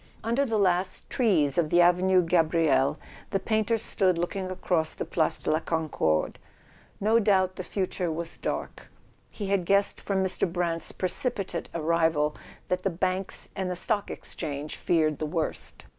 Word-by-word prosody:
Under 235 +5 +1
the 225 -2 0
last 185 -1 0
trees 175 - +2
of 160 -3 +1
the 175 - +4
Avenue 180 +1 +4
Gabriel 165 -4 +2 0.3
the 195 - 0
painter 220 +2 +1
stood 190 -4 +1
looking 185 +2 -2
across 175 -3 -1
the - - -5
Place 160 -2 0
de - - -2
la 155 - +2
Concorde. 155 - -1 0.6
No 220 +3 +3
doubt 190 -3 +2
the 185 - -5
future 185 -2 -2
was 165 +1 -5
dark: - - -5 0.4
he 205 -3 -5
had 195 -2 +2
guessed 200 +3 +2
from 195 -1 0
Mr. 185 -2 0
Brant's 170 -2 -1
precipitate 195 -2 -2
arrival 160 -2 +1 0.3
that 180 0 -1
the 195 - 0
banks 185 +2 -1
and 190 -1 -2
the 180 - -2
Stock 205 +3 +1
Exchange 145 +1 -6
feared 155 -4 +1
the 155 - -2
worst. 160 0 -4
180 Hz, 160 wpm, -27 LUFS, 165-195 Hz, 0.6 s, the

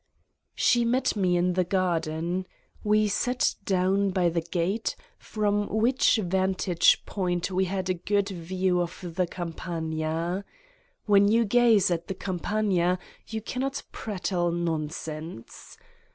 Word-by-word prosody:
She 240 -1 +3
met 245 +2 +1
me 185 -3 +2
in 180 +1 +2
the 185 +1 +2
garden. 175 -1 -1 0.4
We 215 0 +3
sat 245 +5 +1
down 195 +1 +2
by 185 -2 +2
the 170 0 -1
gate, 175 +6 -1 0.2
from 205 -1 -1
which 235 +5 +3
vantage 185 -3 +2
point 180 -2 -2
we 190 +1 +1
had 190 0 -2
a 185 - +2
good 200 0 +1
view 180 0 -1
of 175 0 -5
the 180 -1 +1
Campagna. 165 +1 -3 0.6
When 200 -1 +5
you 230 +2 +3
gaze 220 -3 +4
at 170 -1 -2
the 190 - -4
Campagna 185 -1 0 0.3
you 220 -1 -5
cannot 270 +4 -3
prattle 180 -4 -2
nonsense. 160 -4 -5
185 Hz, 125 wpm, -27 LUFS, 175-205 Hz, 0.6 s, When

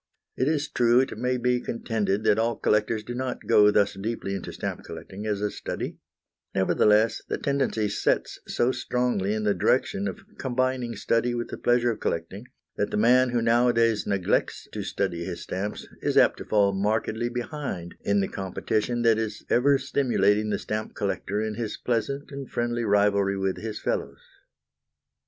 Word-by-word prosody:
It 130 - 0
is 150 -1 +1
true 120 -2 +3
it 130 - -3
may 125 0 0
be 125 0 +1
contended 110 -4 -1
that 110 0 +3
all 115 +1 +1
collectors 105 +1 +1
do 120 - -6
not 130 0 -4
go 105 -2 +6
thus 105 -1 +3
deeply 100 0 -4
into 100 - -5
stamp - - -5
collecting 100 +3 -8
as 105 -1 -1
a 105 -1 0
study; - - -5 0.6
nevertheless 105 +3 +3
the - - -1
tendency 135 -6 0
sets 100 - 0
so 120 +2 +1
strongly 120 -7 0
in 110 - -2
the 105 -1 +3
direction 95 +2 +1
of 95 - -5 0.2
combining 130 -2 -1
study 115 +3 +1
with 120 0 -3
the - - -6
pleasure 120 0 +3
of 115 - -6
collecting, 95 +8 -3 0.3
that 105 - 0
the - - -2
man 125 +4 +5
who 120 -1 0
nowadays 115 -1 +3
neglects 95 -3 0
to - - -4
study 90 -4 -2
his 90 -1 -5
stamps 100 +3 -4
is - - 0
apt - - +5
to - - -7
fall 100 -2 +3
markedly 110 +4 0
behind 120 - -5
in 100 0 +2
the 95 - 0
competition 110 +5 -2
that 115 -1 +4
is 110 -2 -4
ever 140 +3 +4
stimulating 110 -6 +1
the 100 - 0
stamp 110 +2 -4
collector 105 +2 -2
in 110 -1 -2
his 110 -1 -4
pleasant 140 +5 -2
and 140 -1 -7
friendly 120 0 -1
rivalry 100 -2 +2
with 95 -1 -1
his 110 -1 -5
fellows. - - -3
110 Hz, 175 wpm, -26 LUFS, 100-120 Hz, 0.6 s, go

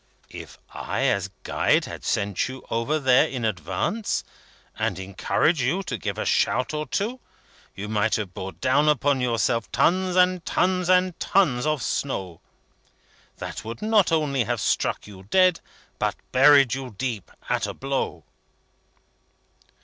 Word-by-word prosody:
"If - - -10 0.2
I, - - -3
as - - +1
Guide, - - +2
had - - -8
sent 100 -2 0
you 130 0 -9
over 115 +7 0
there, 130 +1 +4
in 125 -6 -4
advance, 110 - -2 0.6
and - - -1
encouraged 100 - 0
you 170 +11 0
to 155 -9 -4
give 105 - -4
a - - -2
shout 125 +4 +1
or 150 -1 -3
two, 225 - -2 0.6
you 100 +2 -6
might 110 +1 +1
have 100 -4 -4
brought 95 -2 -7
down 145 - +3
upon 145 -2 +2
yourself 115 -1 0
tons 185 +1 +2
and 180 -1 +3
tons 185 -1 0
and 185 -1 +3
tons 150 -9 +2
of 155 -4 0
snow, 95 - -3 1.0
that - - -6
would 115 - -7
not 215 -4 +3
only 145 -6 +1
have 120 0 -1
struck - - 0
you 100 -2 -12
dead, 185 +2 +4 0.4
but - - 0 0.2
buried 140 -1 +6
you 130 -4 -5
deep, 115 -7 -3 0.2
at - - 0
a - - -5
blow." 135 0 -3
135 Hz, 150 wpm, -24 LUFS, 115-175 Hz, 1.0 s, buried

